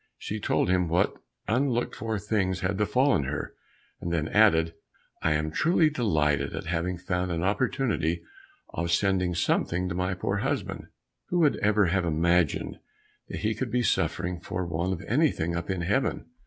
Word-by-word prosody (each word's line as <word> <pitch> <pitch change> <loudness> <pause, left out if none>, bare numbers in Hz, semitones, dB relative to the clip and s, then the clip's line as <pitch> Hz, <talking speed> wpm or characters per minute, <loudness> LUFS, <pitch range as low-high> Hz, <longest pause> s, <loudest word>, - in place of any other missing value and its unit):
She 105 - -5
told - - +1
him 90 -1 +2
what 85 +2 +2 0.3
unlooked 120 +1 +1
for 110 0 -2
things 95 -3 -1
had 95 +2 0
befallen 105 - +2
her, 70 +2 -4 0.5
and 85 - -4
then 80 -2 0
added, 85 -7 +4 0.5
"I 80 - +2
am 75 0 -1
truly 160 - +3
delighted 80 - +1
at - - -5
having 85 +2 -1
found 90 0 -2
an 85 0 -1
opportunity 100 - 0 0.5
of 85 0 -3
sending 90 -1 +1
something 85 +1 0
to - - -2
my 90 +1 -1
poor - - -1
husband. - - -3 0.4
Who 180 - -1
would 150 -3 +3
ever 105 -1 +3
have 90 +2 +1
imagined 85 0 +1 0.5
that - - -6
he 110 +1 +1
could 120 +3 -3
be 125 +1 +1
suffering 90 -5 0
for 90 +1 -4
want 85 +3 -1
of 85 - -6
anything 115 - +1
up 85 +2 -4
in 95 -2 -1
heaven?" 100 +11 0
90 Hz, 170 wpm, -27 LUFS, 85-110 Hz, 0.5 s, added